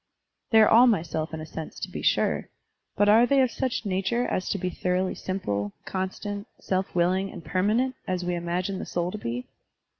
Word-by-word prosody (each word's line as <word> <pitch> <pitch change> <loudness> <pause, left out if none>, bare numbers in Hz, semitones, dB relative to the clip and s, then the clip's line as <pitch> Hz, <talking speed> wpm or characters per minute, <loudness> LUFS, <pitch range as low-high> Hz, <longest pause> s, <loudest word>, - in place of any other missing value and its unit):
They 225 -4 +6
are - - +7
all 240 +3 +7
my 210 -9 +3
self 160 -1 -3
in 160 -1 -5
a - - -6
sense, 160 0 -7
to - - -3
be - - -6
sure, - - +1 0.5
but 205 - +3
are 225 +4 +6
they 275 +2 +4
of 255 - +1
such 255 -4 -2
nature 195 +5 0
as 185 - -2
to - - 0
be 185 -1 -2
thoroughly 185 +1 0
simple, 105 - -3
constant, 200 +2 -4
self 190 -1 -2
willing, 185 +3 +2
and 170 - -10
permanent, 215 +8 +1
as 180 -1 -1
we 180 - 0
imagine 175 +3 -2
the - - -4
soul 175 0 -1
to 215 - -6
be? 120 -2 -4
185 Hz, 205 wpm, -26 LUFS, 175-210 Hz, 0.5 s, are